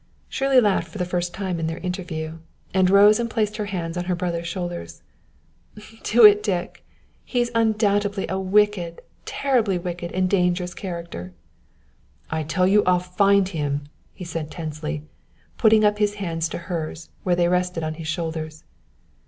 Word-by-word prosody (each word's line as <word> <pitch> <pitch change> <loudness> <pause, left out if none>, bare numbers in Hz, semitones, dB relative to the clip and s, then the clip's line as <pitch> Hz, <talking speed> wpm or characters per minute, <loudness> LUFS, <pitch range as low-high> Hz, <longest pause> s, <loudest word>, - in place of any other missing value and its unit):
Shirley 270 -1 +3
laughed 205 -5 +2
for - - -10
the 180 - -1
first 175 0 -2
time 185 -2 -3
in 160 - -1
their 165 0 -3
interview, 165 -3 -5 0.3
and 185 -1 +4
rose 205 +3 +6
and 235 0 -1
placed 215 -1 -1
her 210 -2 -3
hands 170 -4 -4
on 175 - -2
her 180 0 0
brother's 170 -1 -3
shoulders. 175 - -5 1.0
"Do 230 0 +6
it, 210 0 +8
Dick! 190 -5 -3 0.4
He's 240 -2 -1
undoubtedly 205 -3 +1
a 190 - -2
wicked, 190 -3 +1
a - - -14 0.2
terribly 235 -9 +1
wicked 175 -1 -5
and 185 0 +1
dangerous 180 -1 +1
character." 170 - -6 1.0
"I 160 0 -1
tell 160 +4 +1
you 205 +2 +4
I'll 180 0 +4
find 195 +2 +2
him," 145 -5 -2 0.3
he 180 - -9
said 160 -2 -4
tensely, 155 -2 -5 0.6
putting 220 -1 +5
up 210 0 +2
his 205 -1 +1
hands 165 -5 -2
to - - -4
hers, 165 -2 -5
where 180 -2 +1
they 175 0 +2
rested 180 -1 0
on 155 0 -2
his 160 0 -8
shoulders. 160 -1 -4
180 Hz, 165 wpm, -23 LUFS, 165-205 Hz, 1.0 s, it